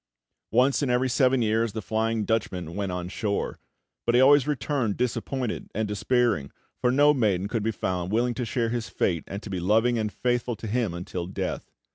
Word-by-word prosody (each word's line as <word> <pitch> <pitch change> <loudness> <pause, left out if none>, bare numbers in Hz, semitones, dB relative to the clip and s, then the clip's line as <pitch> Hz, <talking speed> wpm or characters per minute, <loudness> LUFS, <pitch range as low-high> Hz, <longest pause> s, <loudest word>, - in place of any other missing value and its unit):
Once 130 +5 +3
in 140 - 0
every 125 +1 +2
seven 130 0 +3
years 110 0 +1
the 110 - -3
Flying 110 +1 0
Dutchman 95 -7 -2
went 100 -2 -2
on 90 -1 -3
shore; 100 +2 -2 0.5
but 120 - +3
he 125 - +6
always 140 +1 +6
returned 125 -5 -1
disappointed 125 0 -2
and 110 +1 0
despairing, 105 - +1 0.3
for 125 - +2
no 145 +3 +5
maiden 100 -8 +1
could 115 +1 -2
be 110 - 0
found 90 -4 -2
willing 120 +3 +1
to 125 - -3
share 120 0 -1
his 120 -1 -3
fate 85 -5 0
and 100 +2 -6
to - - -7
be 95 - -2
loving 115 +6 +2
and 105 -1 -1
faithful 120 0 -1
to 110 - -9
him 110 -4 -1
until 85 0 -5
death. 95 - -4
115 Hz, 195 wpm, -26 LUFS, 100-125 Hz, 0.5 s, he